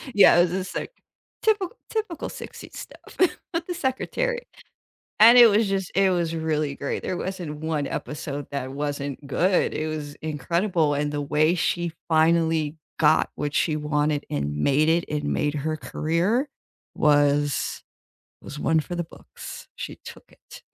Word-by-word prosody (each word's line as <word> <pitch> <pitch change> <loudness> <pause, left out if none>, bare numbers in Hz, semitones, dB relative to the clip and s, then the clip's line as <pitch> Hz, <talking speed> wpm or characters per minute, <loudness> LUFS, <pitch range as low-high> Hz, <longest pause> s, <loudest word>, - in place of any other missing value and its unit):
Yeah, 200 - +7
it - - +7
was 175 -1 +2
a 185 +1 -1
sec - - -5 0.5
typical 425 -1 +1
typical 435 -7 -3
'60s - - -10
stuff - - -12 0.4
with 335 0 -1
the 355 - -2
secretary. 480 - -2 0.7
And 230 +3 +9
it 240 -1 +10
was 215 +1 +3
just 195 -2 -2
it 195 0 +4
was 170 -2 0
really 155 -3 -1
great 140 - -4
there 185 - -2
wasn't 175 -6 -5
1 155 -2 -2
episode 145 -1 -5
that 130 -2 -3
wasn't 145 0 -4
good. 180 +6 +2
It 155 - -2
was 150 -2 -5
incredible, 160 +2 0
and 145 +1 -1
the 145 0 -2
way 155 +4 +2
she 175 -1 -1 0.2
finally 160 -1 +2 0.2
got 150 - +4
what 150 0 -3
she 155 0 +1
wanted 150 0 0
and 75 0 -2
made 140 - +3
it, 170 +1 +2
and 150 -1 -2
made 145 0 0
her 155 +2 -2
career 180 - 0 0.5
was 145 -2 +2 0.6
was 150 - -8
one 160 +1 +2
for 175 - -6
the 175 0 -2
books. 160 - -11
She - - -6
took - - -11
it. - - -15
160 Hz, 160 wpm, -24 LUFS, 145-185 Hz, 0.7 s, it